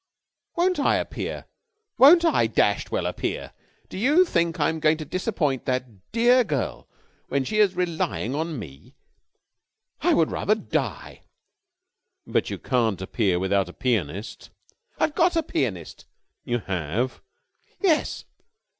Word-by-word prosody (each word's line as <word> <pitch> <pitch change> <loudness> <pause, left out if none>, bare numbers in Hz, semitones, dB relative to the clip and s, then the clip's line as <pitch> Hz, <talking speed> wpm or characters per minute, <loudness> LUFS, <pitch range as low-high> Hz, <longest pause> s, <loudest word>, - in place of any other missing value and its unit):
"Won't 360 -1 +1
I - - +3
appear! - - -4 0.5
Won't 335 +6 +8
I 330 - +3
dashed - - +1
well - - -1
appear! - - -3 0.3
Do - - -7
you 295 - +4
think 170 - 0
I'm 160 +2 +1
going 155 0 +3
to 155 - -6
disappoint 155 - -1
that 125 -7 -4
dear 245 +2 +4
girl 145 - -3 0.4
when 140 0 0
she 215 +11 -1
is 205 -3 +4
relying 165 -8 -2
on 160 +1 -3
me? 70 - -11 1.1
I - - +3
would 165 -2 +2
rather 215 - +1
die!" 220 - -4 1.0
"But - - 0
you - - -4
can't 115 -7 0
appear 95 -1 0
without 95 0 0
a - - -10
pianist." 105 - -3 0.5
"I've 310 - +1
got 350 +1 +2
a 330 - +2
pianist." 95 - -3 0.4
"You 120 - 0
have?" 95 - -2 0.6
"Yes. 340 -7 +1
150 Hz, 135 wpm, -24 LUFS, -, 1.1 s, Won't